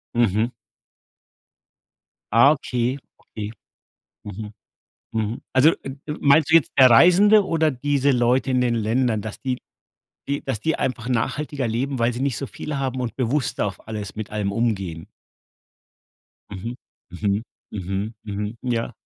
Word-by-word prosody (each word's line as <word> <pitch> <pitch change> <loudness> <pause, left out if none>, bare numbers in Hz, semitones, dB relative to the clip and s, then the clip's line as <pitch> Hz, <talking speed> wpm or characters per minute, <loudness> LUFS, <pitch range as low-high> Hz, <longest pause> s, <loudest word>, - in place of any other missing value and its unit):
Mhm. 110 -1 +2 1.9
Ah, 120 +5 +7
okay, 125 -3 -1 0.2
okay. 105 -1 -7 0.7
Mhm. 105 +1 -7 0.6
Mhm. 110 0 -2
Also, 130 +5 +6
äh, 135 - -6 0.3
meinst 145 +2 +4
du - - +4
jetzt 165 -4 +5
der 130 - +9
Reisende 195 - +7
oder 160 -3 +2
diese 140 +1 +1
Leute 125 +1 +2
in 125 -1 +2
den 120 -1 +1
Ländern, 115 0 +1
dass 110 0 -7
die 130 -2 -2 0.7
die 140 0 -1
dass 130 -6 -3
die 160 +7 0
einfach 120 -2 -2
nachhaltiger 135 +3 -1
leben, 130 +4 -2
weil 115 +1 +2
sie 120 - -5
nicht 135 -3 0
so 140 - -4
viel 150 +3 -6
haben 130 -2 -2
und 120 -2 -4
bewusster 130 -2 0
auf 95 +1 -8
alles 105 -3 -5
mit 110 -1 -6
allem 105 -2 -2
umgehen? 95 -8 -2 1.4
Mhm. 105 +5 -5 0.4
Mhm. 100 +3 -1 0.3
Mhm. 100 +2 -3
Mhm. 105 +2 -4
Ja. 120 -2 -1
120 Hz, 140 wpm, -23 LUFS, 110-135 Hz, 1.9 s, der